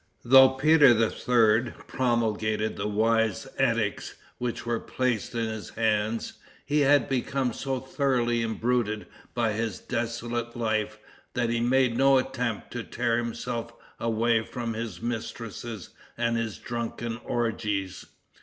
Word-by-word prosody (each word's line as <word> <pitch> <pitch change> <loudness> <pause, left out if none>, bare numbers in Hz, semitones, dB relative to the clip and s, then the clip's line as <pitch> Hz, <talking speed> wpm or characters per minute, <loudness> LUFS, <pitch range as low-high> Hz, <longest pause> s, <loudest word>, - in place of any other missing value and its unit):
Though 130 +2 +8
Peter 135 -2 +5
III. 115 0 +2
promulgated 110 -3 0
the 100 - -2
wise 110 +2 +1
edicts 115 -6 0 0.2
which 120 -1 -3
were 120 -1 0
placed 125 -3 -2
in 115 -1 0
his 110 -2 -6
hands, 110 0 -1 0.3
he 150 +1 +1
had 145 -3 +4
become 130 -1 -1
so 135 +1 -2
thoroughly 125 -3 0
imbruted 115 -1 0 0.3
by 115 -3 +1
his 110 -2 -2
dissolute 120 0 -3
life 110 -2 -1 0.4
that 120 -2 +1
he 115 - +1
made 125 0 +3
no 135 0 +6
attempt 125 -4 -2
to - - -4
tear 115 0 0
himself 115 0 -4 0.3
away 115 0 +1
from 120 -1 -4
his 110 -4 -5
mistresses 115 -2 -5 0.3
and 115 0 +1
his 115 -2 -2
drunken 115 -1 -4
orgies. 105 -5 -2
115 Hz, 125 wpm, -27 LUFS, 110-125 Hz, 0.4 s, Though